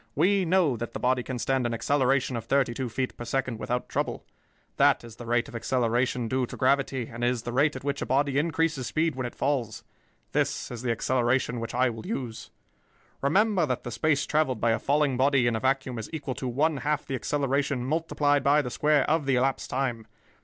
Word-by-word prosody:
We 190 +5 +3
know 165 -7 +2
that 120 +1 -5
the - - -4
body 125 0 +2
can 125 +1 -5
stand 130 0 0
an 115 - -2
acceleration 135 0 +1
of 115 - -4
thirty 135 -3 +2
two 125 0 -3
feet 130 +3 -3
per - - -6
second 120 -1 -2
without 125 +2 -2
trouble. - - -3 0.5
That - - +4
is 115 -1 -12
the 120 - -9
rate 120 +1 +1
of 135 - -11
acceleration 120 0 0
due 130 +1 0
to - - -9
gravity 135 -1 +1
and 120 +1 -5
is 120 -1 0
the 120 - -4
rate 145 +3 +2
at 130 - -7
which 140 0 -2
a - - -3
body 140 +1 +2
increases 160 -4 0
speed 160 0 0
when 130 -1 -2
it - - -10
falls. 130 -6 -1 0.5
This - - -1
is 120 -2 -6
the 125 - -2
acceleration 120 +1 +1
which 115 +1 -5
I 125 0 +3
will 115 +8 -8
use. 120 - -5 0.7
"Remember 185 +4 +3
that 125 -2 -2
the 120 - -5
space 145 +3 +1
traveled 150 -6 +1
by 115 +1 +2
a 115 - +1
falling 145 -2 +1
body 135 -1 +3
in 120 -1 +2
a - - -1
vacuum 130 -1 0
is 110 - -6
equal 145 -5 -4
to 130 - -5
one 145 +5 +1
half 150 +3 -1
the 135 - -5
acceleration 140 -1 -1
multiplied 145 -1 +1
by 145 +1 +4
the 125 - -5
square 150 0 +2
of 155 -2 +1
the 135 - +3
elapsed 130 +2 0
time. 120 -4 -2
130 Hz, 215 wpm, -27 LUFS, 120-145 Hz, 0.7 s, That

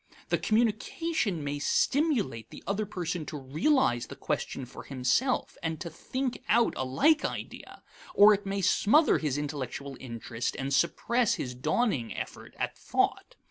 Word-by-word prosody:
The - - +2
communication 220 - 0
may 145 0 -3
stimulate 210 - +1
the - - -11
other 200 +3 -1
person 175 -3 -3
to 150 - -5
realize 140 - +1
the - - -9
question 130 - -3
for 125 - -10
himself 135 - 0
and 160 -1 -2
to 170 - -6
think 255 - -3
out 235 +1 +4
a - - -2
like 290 - +3
idea, - - -6 0.3
or 210 +1 +8
it 205 0 -1
may 195 0 -2
smother 255 - +4
his 145 -3 -1
intellectual 140 -2 -4
interest 115 -1 -4
and 135 +1 -2
suppress 235 - +2
his 125 - -4
dawning 150 - 0
effort - - -7
at - - -2
thought. - - -1
170 Hz, 150 wpm, -29 LUFS, -, 0.3 s, or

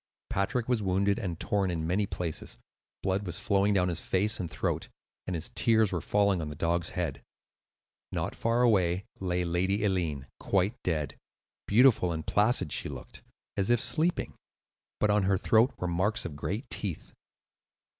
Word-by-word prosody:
Patrick 115 +5 0
was 125 -3 +1
wounded 100 +2 +1
and 90 -7 -4
torn 100 -2 0
in 80 -2 -2
many 95 +5 +1
places; 85 -4 -4 0.5
blood 95 +1 0
was 90 0 -2
flowing 100 0 +2
down 95 -3 +3
his 85 -2 0
face 105 +4 +1
and 85 - -3
throat, - - -2 0.4
and 90 - -2
his 80 - -2
tears 110 -3 +3
were 90 -3 -1
falling 100 -3 +2
on 75 - -4
the 75 - -7
dog's 85 +3 0
head. 75 -6 -2 0.9
Not - - -2
far 115 +2 +1
away 95 -5 +3
lay 90 -1 -1
Lady 95 +5 0
Eileen, 85 -8 -1
quite 100 +2 +1
dead. 75 -5 -1
Very - - -25 0.5
beautiful 110 -5 +5
and 80 -1 -4
placid 105 - +2
she - - -2
looked, - - -9 0.3
as 100 +2 0
if 120 -1 +4
sleeping; 155 +10 +1 0.7
but 105 - +3
on 105 0 +3
her 95 0 +3
throat 110 +6 +4
were 90 - -2
marks 100 +8 0
of 75 - -5
great 100 - -4
teeth. 95 -7 -3
95 Hz, 170 wpm, -29 LUFS, 85-105 Hz, 0.9 s, beautiful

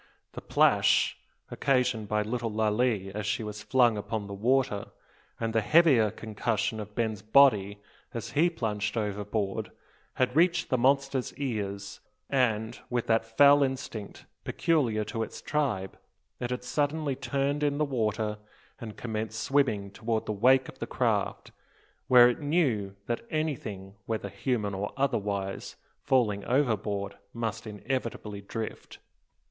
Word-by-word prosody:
The - - -8
plash - - +3 0.4
occasioned 125 -5 +1
by 105 +1 +1
little 115 +2 -2
Lalee 110 -2 0
as 105 0 -4
she 105 +2 -1
was 105 -1 -6
flung 120 -3 +3
upon 105 0 -3
the 100 - -7
water, 115 -1 +1 0.5
and 115 -1 -2
the 110 - +3
heavier 135 -4 +5
concussion 110 +1 -2
of 105 0 -8
Ben's 110 -3 -1
body 110 -4 +4 0.3
as 115 0 -5
he 155 +6 +3
plunged 105 -8 -2
overboard, 105 -1 -2 0.5
had 130 0 0
reached 175 +2 +3
the 130 - +3
monster's 135 0 +1
ears; 100 -7 -4 0.3
and, 115 -5 +1
with 120 -1 -1
that 115 0 +2
fell 145 0 +7
instinct 130 -6 -3 0.2
peculiar 130 -11 +1
to 115 +2 -4
its 110 - -5
tribe, 125 -11 -2 0.4
it 120 - -3
had 125 0 -3
suddenly 145 +2 -1
turned 140 +2 -1
in 145 -1 +1
the 150 - +2
water, 110 -5 -1 0.4
and 110 -3 -8
commenced 110 -1 -4
swimming 110 -9 +1
toward 110 +1 -2
the - - -2
wake 130 +5 +4
of - - -12
the - - -4
craft; - - -1 0.6
where 125 -1 +8
it 120 - 0
knew 135 - 0
that 120 +1 -2
anything, 115 -11 -3
whether 110 -1 -2
human 110 -6 -2
or 100 +2 -3
otherwise, 100 -8 -2 0.3
falling 105 -6 +1
overboard, 105 -7 0 0.2
must 115 -1 -3
inevitably 110 -2 -4
drift. 110 +2 -6
115 Hz, 140 wpm, -28 LUFS, 105-130 Hz, 0.6 s, where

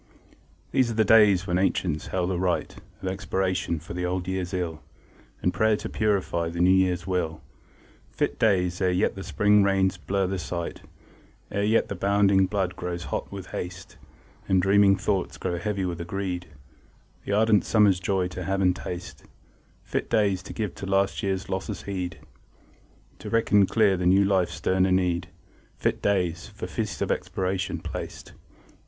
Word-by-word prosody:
These 130 -3 +2
are 115 - -3
the 110 0 +3
days 100 -4 +6
when 90 0 0
ancients 90 -4 0
held 90 0 -1
a 90 - -1
rite 90 -1 -1 0.3
Of - - -2
expiation 95 -2 -1
for 80 +2 -9
the 90 +1 -3
old 90 0 -2
year's 95 -1 -2
ill, 85 -4 -3 0.6
And - - +2
prayer 110 -1 +2
to - - -6
purify 95 -5 0
the 85 +1 -6
new 90 +1 +5
year's 90 -2 +2
will; 90 -4 -2 0.7
Fit - - -2
days, 90 -5 +2
ere 95 - +3
yet 90 +3 +1
the 95 - -7
spring 105 +4 +3
rains 95 -1 +2
blur 100 0 -1
the 95 0 -2
sight, 85 -1 -5 0.7
Ere 100 - -1
yet 110 +2 +2
the - - -4
bounding 100 -1 +3
blood 95 -2 -1
grows 90 -1 -4
hot - - -3
with 95 -2 -8
haste, 90 0 -6 0.5
And 95 -1 +4
dreaming 100 +1 +5
thoughts 95 -2 -1
grow 90 -2 -2
heavy 100 0 -2
with 85 -2 -3
a - - -5
greed 90 -1 -3 0.8
The 100 - -2
ardent 105 0 +4
summer's 105 -4 +4
joy 95 0 0
to 90 -1 -6
have 95 +2 0
and 90 -2 +3
taste; 90 -1 -7 0.6
Fit - - -3
days, 100 -4 +2
to 90 - -10
give 105 -5 -3
to 95 - -4
last 95 0 +1
year's 95 -1 -2
losses 95 0 -4
heed, 90 -4 -4 1.0
To - - -7
reckon 105 -3 +3
clear 105 -4 +3
the 90 0 0
new 95 +2 +5
life's 95 -2 +1
sterner 95 0 +1
need; 90 -1 +1 0.5
Fit - - -1
days, 90 -4 0
for - - -7
Feast - - -3
of - - -1
Expiation 95 0 -2
placed! - - -7
95 Hz, 170 wpm, -26 LUFS, 90-100 Hz, 1.0 s, days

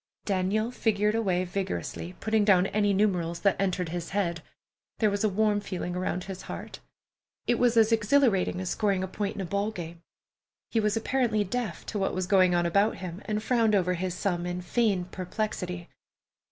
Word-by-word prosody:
Daniel 200 +4 0
figured 210 -3 +1
away 190 -5 +1
vigorously, 185 -1 -4
putting 220 -1 +2
down 190 -3 +5
any 205 0 +1
numerals 180 -4 +1
that 200 -2 +3
entered 185 -3 0
his 170 0 -4
head. 170 -4 -1 0.6
There 215 -2 +2
was 200 +1 -1
a 215 - +3
warm 210 +1 +2
feeling 185 -3 -4
around 180 0 -2
his 190 -1 -7
heart. - - -7 0.7
It 240 - +1
was 245 -1 +3
as 220 0 +5
exhilarating 225 -5 +3
as 185 -1 -3
scoring 200 -3 +1
a - - -2
point 200 +2 -3
in - - -4
a - - -3
ball 200 +4 -1
game. 170 -5 -8 0.7
He 230 - +2
was 210 0 +1
apparently 225 -2 +1
deaf 210 -3 -4
to 210 - -3
what 195 - 0
was 185 0 -1
going 185 -2 +4
on 175 0 +2
about 200 +6 +2
him, 180 +1 -7
and 215 0 -2
frowned 225 -3 +3
over 180 -2 +2
his 180 0 -2
sum 175 -2 -1
in 180 0 -3
feigned 195 -4 0
perplexity. 180 -2 -4
195 Hz, 185 wpm, -28 LUFS, 180-215 Hz, 0.7 s, down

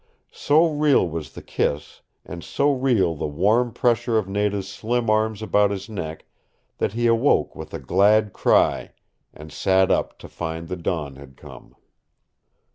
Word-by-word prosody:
So 155 +4 +3
real 150 - +2
was 80 -2 -6
the - - -10
kiss, 75 +1 -3 0.2
and 85 -1 -8
so 145 +1 +1
real 120 -10 +1
the 75 - -4
warm 105 +11 +1
pressure 120 0 +1
of 105 -3 -1
Nada's 100 0 -1
slim 115 +3 -2
arms 110 0 0
about 105 -1 +2
his 100 +1 -5
neck 80 -7 -6 0.5
that - - -1
he 120 +1 -1
awoke 115 +4 +2
with - - -9
a - - -6
glad 105 +2 +2
cry - - +1 0.4
and 75 +1 -13
sat 95 -1 +2
up - - -1
to - - -12
find 80 0 -6
the 90 - -3
dawn 80 -6 -4
had 65 -1 -14
come. - - -14
100 Hz, 160 wpm, -22 LUFS, 85-115 Hz, 0.5 s, So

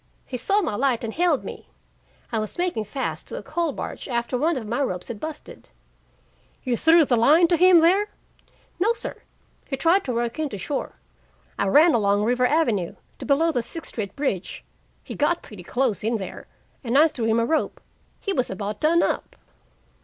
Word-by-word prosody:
"He 255 - -6
saw 390 - +1
my 265 - -2
light 245 +1 0
and 225 -1 -4
hailed 340 -4 +1
me. - - -9 0.6
I 225 - 0
was 215 -1 -5
making 350 -12 -1
fast 265 +6 -4
to - - -7
a - - -6
coal 340 -3 -1
barge - - -6
after 235 0 -1
one 310 +4 +1
of 235 - -5
my 235 +6 -2
ropes 180 -8 -3
had 225 -3 -6
busted." 310 +3 -8 0.9
"You 250 -3 0
threw 325 +5 +5
the 250 - +2
line 300 +9 +5
to 345 - +4
him 360 -1 +6
there?" 380 +5 +4 0.7
"No, 430 +6 +3
sir. - - -7 0.5
He 270 - -3
tried 340 +7 +3
to 255 - -2
work 235 +3 -2
in 310 -2 -1
to 205 - -6
shore. 185 - -4 0.7
I - - +1
ran 305 - +6
along 205 -2 +2
River 250 +2 +2
Avenue 235 - +1 0.2
to - - -7
below 315 +4 +3
the 245 - 0
Sixth 325 +8 -7
Street 200 -4 -5
bridge. 265 -11 -3 0.4
He - - -8
got 330 +4 0
pretty 210 -4 -11
close 245 +3 -1
in 225 +2 0
there 195 -4 -6 0.4
and 245 +2 +1
I 310 +3 +7
threw 245 -7 -4
him 225 +1 +2
a 230 - +2
rope. 315 +5 -1 0.4
He 395 - -2
was 255 -6 0
about 200 +2 -4
done 330 +2 +4
up." - - -2
260 Hz, 200 wpm, -24 LUFS, 225-325 Hz, 0.9 s, I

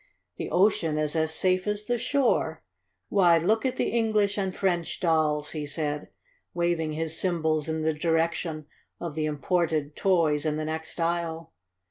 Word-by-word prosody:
"The - - -4
ocean 175 -5 +2
is 155 +1 0
as 160 -1 +1
safe 185 +3 +1
as 210 0 -1
the 240 +1 0
shore. 270 +2 +1 0.5
Why, 175 -4 +5
look 220 +9 +2
at 255 - -3
the - - +1
English 215 -3 +1
and 190 -2 -2
French 175 -4 -1
dolls," 155 -3 +1
he 150 -2 -4
said, 150 0 -2 0.5
waving 170 -3 0
his 160 +1 -3
cymbals 160 -4 0
in 160 0 -1
the 160 0 +2
direction 165 0 -1 0.3
of 170 -3 -4
the 155 0 -1
imported 155 0 0
toys 165 -6 +2
in 155 -1 0
the 155 - -2
next 160 +2 -5
aisle. 165 -1 -2
165 Hz, 160 wpm, -27 LUFS, 155-185 Hz, 0.5 s, Why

